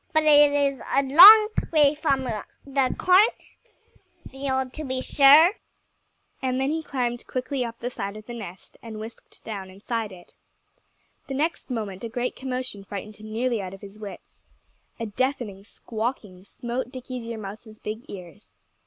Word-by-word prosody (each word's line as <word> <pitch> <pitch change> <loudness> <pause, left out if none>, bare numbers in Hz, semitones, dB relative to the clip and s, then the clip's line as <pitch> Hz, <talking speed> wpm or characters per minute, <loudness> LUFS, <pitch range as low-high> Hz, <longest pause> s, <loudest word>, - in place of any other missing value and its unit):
"But 315 0 +3
it 295 -1 +7
is 280 -3 0
a 275 - +4
long 400 +10 +9 0.2
way 300 -3 +5
from 285 -3 0
the 260 +3 -3
cornfield, 270 - -1
to 310 - -6
be 260 -2 -3
sure." 290 +6 +6 0.9
And 255 0 -1
then 270 +2 0
he 320 +1 -2
climbed 245 -5 -3
quickly 255 +1 -3
up 230 -1 -6
the 245 +1 -5
side 200 -2 -5
of 215 - -12
the 240 - -8
nest 195 -6 -10
and 220 -2 -8
whisked 220 +2 -11
down 200 -4 -6
inside 215 +3 -4
it. 175 -2 -15 0.9
The 270 - -4
next 310 +3 -2
moment 210 -5 -5
a 230 - -4
great 245 +2 -3
commotion 255 -5 -5
frightened 205 +2 -8
him 215 0 -11
nearly 235 0 -1
out 190 0 -7
of 195 - -17
his 200 +1 -12
wits. 205 -2 -11 0.6
A 230 - -3
deafening 220 -3 -3
squawking 215 -4 -6
smote 245 +4 -5
Dickie 255 -1 -7
Deer 230 -1 -6
Mouse's 215 +1 -9
big 215 +3 -6
ears. 185 +1 -12
245 Hz, 160 wpm, -25 LUFS, 215-275 Hz, 0.9 s, long